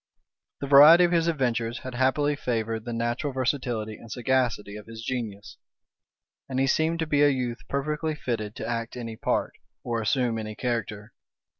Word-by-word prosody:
The 140 - -3
variety 150 +5 +9
of 175 - +3
his 170 -1 +2
adventures 120 -7 -1
had 130 - -6
happily 135 +4 +1
favored 115 -4 -2
the 120 - -4
natural 120 +4 -2
versatility 120 -4 -1
and 115 - -13
sagacity 125 -5 0
of 105 0 -10
his 115 0 -9
genius; 110 -5 -5 0.9
and 130 -1 -1
he 135 - +3
seemed 160 +4 +1
to 165 - -1
be 145 -2 +1
a 145 - +6
youth 125 -3 -2
perfectly 150 +3 -2
fitted 110 -6 -4
to - - -5
act 115 0 -3
any 115 -2 -6
part, - - -1 0.3
or 115 -2 -2
assume 115 +2 0
any 110 -1 -6
character. 110 -3 -3
125 Hz, 170 wpm, -26 LUFS, 115-140 Hz, 0.9 s, variety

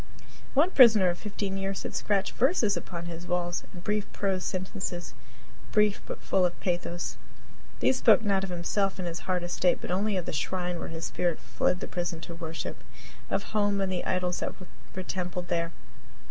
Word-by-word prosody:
One 315 +7 +5
prisoner 220 - +8
of 175 - -6
fifteen 200 -2 -3
years 195 0 -2
had - - -4
scratched 200 -2 +1
verses 250 - +3
upon 170 -1 -5
his 170 +1 -7
walls, 175 0 0
and 175 -2 -10
brief 210 0 -1
prose 190 -2 0
sentences 185 -1 -3 0.6
brief, 210 -1 +3
but - - -6
full 190 - +2
of 175 -1 +1
pathos. 175 -1 -2 0.6
These 260 - +4
spoke 230 - +6
not 195 -2 +2
of 195 - -3
himself 190 +3 0
and 185 -2 -3
his 170 0 -3
hard 180 -1 +1
estate, 175 +1 +2
but - - -5
only 200 +2 +1
of 180 - -2
the - - -4
shrine 180 +3 -1
where - - -4
his 165 0 -5
spirit 175 -3 0
fled 180 - 0
the - - -3
prison 175 -2 -3
to 170 - -7
worship 165 -1 -5 0.5
of - - 0
home 205 -1 +2
and 195 -1 0
the 180 - -1
idols 180 -1 0
that - - -3
were 185 0 -9
templed 180 -1 -3
there. 170 -1 0
185 Hz, 190 wpm, -29 LUFS, 175-200 Hz, 0.6 s, prisoner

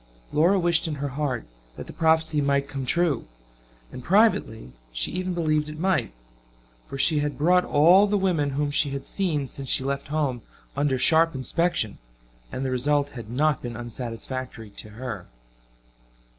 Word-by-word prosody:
Laura 170 +6 +4
wished 170 -2 +1
in 155 - -3
her 145 0 -3
heart 135 -3 -3 0.3
that - - -7
the - - -10
prophecy 160 -1 +2
might 140 0 +1
come 135 -2 -5
true; 170 -6 +1 0.6
and 125 - -9
privately 185 - +2 0.2
she - - -2
even 185 -1 -3
believed 155 -3 0
it 155 - -8
might 165 - 0 0.8
for 135 - -7
she 150 +2 +3
had 145 0 -2
brought 180 +4 +3
all 175 +7 +5
the 205 0 +1
women 175 -7 +1
whom 145 -1 0
she 145 0 +2
had 140 0 -5
seen 160 -8 -1
since 135 0 -6
she - - +4
left 140 +1 -3
home 145 -5 -1 0.3
under 140 -1 +1
sharp 160 +4 +4
inspection, 150 - 0 0.5
and 135 - -4
the 130 - -1
result 145 +3 +1
had 120 -4 -9
not 150 +4 +1
been 120 -2 -6
unsatisfactory 120 -1 -6
to 105 - -8
her. 115 -3 -7
145 Hz, 165 wpm, -25 LUFS, 130-165 Hz, 0.8 s, all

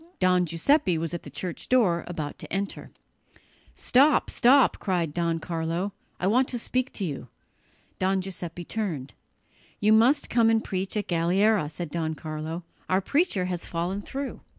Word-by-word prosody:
Don 180 -1 +3
Giuseppe 175 - +2
was 165 +1 -3
at 170 - -3
the - - -10
church 175 +5 -5
door, 200 -10 +3
about 155 -5 -5
to - - -9
enter. 195 +1 -3 0.9
"Stop, 280 +5 +3
stop," 260 +1 +4
cried 175 -6 -1
Don 170 -1 0
Carlo, 165 +4 -3 0.3
"I - - -1
want 250 +7 +3
to 245 - -2
speak 255 +2 -1
to 200 - -3
you." 140 -6 -5 0.7
Don 190 +1 +2
Giuseppe 175 -2 -6
turned. 160 -13 -4 0.7
"You 210 +1 +4
must 250 +7 +4
come 230 -1 +3
and 225 -1 +2
preach 190 +1 -3
at 205 - -2
Galliera," 180 +1 +2
said 165 0 -6
Don 160 -2 -2
Carlo; 155 +2 -5 0.3
"our 185 - +3
preacher 275 - +1
has 180 -2 -4
fallen 180 +4 -2
through." 275 +6 -5
185 Hz, 160 wpm, -26 LUFS, 165-220 Hz, 0.9 s, stop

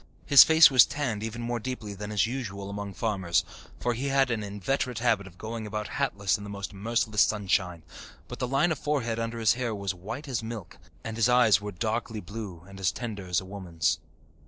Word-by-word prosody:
His 140 -2 +10
face 160 -1 +7
was 130 -3 +8
tanned 125 -8 -2
even 115 +2 -5
more 120 0 -2
deeply 110 -3 -5
than 105 +1 -6
is 105 -1 +2
usual 100 -5 -5
among 100 -1 -6
farmers, 95 -7 0 0.3
for 120 - 0
he 130 +4 -3
had 135 -2 +2
an 115 -2 -1
inveterate 105 +5 -2
habit 110 -4 +1
of 90 -1 -15
going 110 +1 -5
about 105 0 -4
hatless 100 -8 0
in - - -8
the 105 - -7
most 100 0 -6
merciless 110 +1 0
sunshine; 90 -5 +1 0.4
but - - -8
the 125 - -1
line 140 +7 +2
of 155 - -2
forehead 120 -6 -1
under 115 0 -3
his 110 -2 +4
hair 120 -3 -2
was 100 -1 -2
white 110 - -7
as 125 -5 -2
milk, 110 -4 -8 0.2
and 110 0 -5
his 115 +1 +3
eyes 115 -6 +5
were 105 0 -5
darkly 110 +3 -2
blue 100 -5 -8
and 100 0 -11
as 90 -3 +2
tender 100 +1 -6
as 90 -2 +1
a 95 - -9
woman's. 85 -5 -1
110 Hz, 210 wpm, -27 LUFS, 100-120 Hz, 0.4 s, His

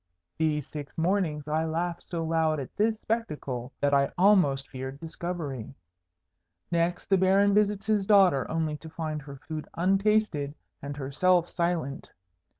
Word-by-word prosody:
These 150 -3 +1
six 145 -2 -8
mornings 165 -4 0
I 155 +1 +1
laughed 170 +2 -3
so 170 -2 -2
loud 160 -1 +1
at 135 - -7
this 220 +1 +1
spectacle, 145 - -3
that 145 0 +1
I 140 0 +4
almost 175 -9 +4
feared 130 +1 -7
discovery. 160 -7 -5 1.0
Next, 170 0 0
the 195 -1 +3
Baron 195 +2 +4
visits 205 -1 +2
his 210 -2 +1
daughter, 190 -10 +5
only 160 -2 -1
to 160 - -11
find 155 -2 -4
her 140 -1 -10
food 155 -1 -5
untasted 195 -5 +1 0.3
and 140 0 -6
herself 170 +6 +2
silent. 170 -6 -2
160 Hz, 145 wpm, -28 LUFS, 145-185 Hz, 1.0 s, daughter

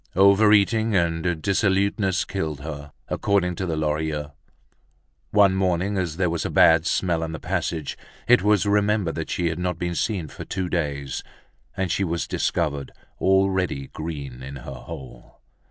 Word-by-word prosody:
Overeating 105 +3 +5
and 85 -2 0
dissoluteness 100 0 +1
killed 80 -7 -3
her, 75 -1 -7 0.2
according 95 -3 +1
to 95 - -2
the 80 -2 -2
Lorilleuxs. 75 -1 -1 1.0
One 100 +3 +5
morning, 95 +1 0
as 90 -4 -2
there 90 -1 +2
was 85 - -2
a - - -2
bad 80 +1 +5
smell 85 -3 +1
in 80 0 -3
the 80 - -5
passage, 80 -4 -2 0.3
it 125 +1 +6
was 105 -1 +3
remembered 105 -3 +2
that 80 - -4
she 85 -2 0
had 85 +1 -4
not 90 -1 -1
been 85 0 -2
seen 90 -2 -1
for - - -9
two 95 -2 -3
days, 70 -6 -2 0.6
and 95 -2 -1
she 100 - +1
was 85 -2 -1
discovered 70 -2 -1 0.3
already 95 -7 +1
green 70 -6 -6
in 70 +2 -7
her 70 +1 -8
hole. 65 0 -10
85 Hz, 155 wpm, -24 LUFS, 80-95 Hz, 1.0 s, it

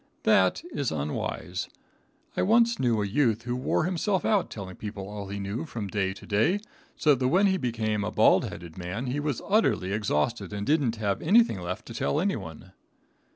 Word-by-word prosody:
That - - +3
is 140 - -1
unwise. 75 -1 -3 0.7
I - - +1
once 230 +3 +4
knew 115 -4 +2
a - - -1
youth 115 +1 +1
who 120 0 -2
wore 125 - 0
himself 185 +3 0
out 205 -4 +2
telling 95 -3 -7
people 100 -2 -6
all 100 -1 -6
he 100 +1 -5
knew 100 +6 -3
from 110 -9 -5
day 95 -1 0
to - - -12
day, 110 - +2 0.4
so 150 - +4
that 130 -1 +1
when 185 +9 +4
he 190 -1 +3
became 110 - -1
a 105 - -1
bald 105 - +4
headed 85 0 -8
man 90 +8 -4
he 130 +3 -2
was 145 -4 -2
utterly 200 - +2
exhausted 105 +1 -1
and 100 0 -3
didn't 140 -5 +2
have 105 -3 -1
anything 200 - +4
left 90 +5 -5
to 115 - -9
tell 145 - 0
anyone. 95 - -3
115 Hz, 190 wpm, -27 LUFS, 100-150 Hz, 0.7 s, once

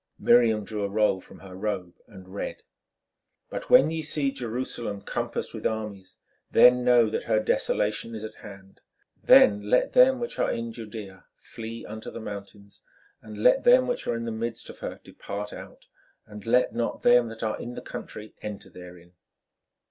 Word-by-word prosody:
Miriam 115 -3 +4
drew 105 -1 -5
a 100 - -1
roll 105 -2 +1
from - - -16
her 95 -1 -11
robe 95 -3 -3
and 95 0 -14
read: 100 - -5 0.9
"But - - -6
when 155 +4 +6
ye 165 0 -2
see 150 -2 0
Jerusalem 120 -4 -4
compassed - - -4
with - - -1
armies, 105 -4 -6 0.3
then 125 0 +6
know 120 -2 +5
that - - -3
her 110 - +2
desolation 110 +1 -1
is 110 - -7
at 110 0 -6
hand. 95 -1 -13 0.4
Then 105 0 +6
let 125 - +2
them 255 +1 +6
which 235 0 -5
are - - +2
in 115 0 -3
Judæa 105 -4 -9
flee 115 0 -8
unto 110 +1 -7
the - - -8
mountains; 100 -1 -9 0.4
and 105 -1 -8
let 125 - +5
them 255 +1 +6
which 245 - -3
are - - 0
in 115 0 -4
the 115 - -3
midst 115 +1 -5
of - - -17
her - - -6
depart 105 +1 -7
out; - - -11 0.4
and 105 0 -11
let 125 +2 +3
not 115 0 -3
them 120 -1 +5
that 115 0 -8
are 110 -1 -2
in 120 +1 -7
the - - -6
country 110 0 -8
enter 105 -1 -7
therein. 90 -1 -13
110 Hz, 180 wpm, -26 LUFS, 100-120 Hz, 0.9 s, when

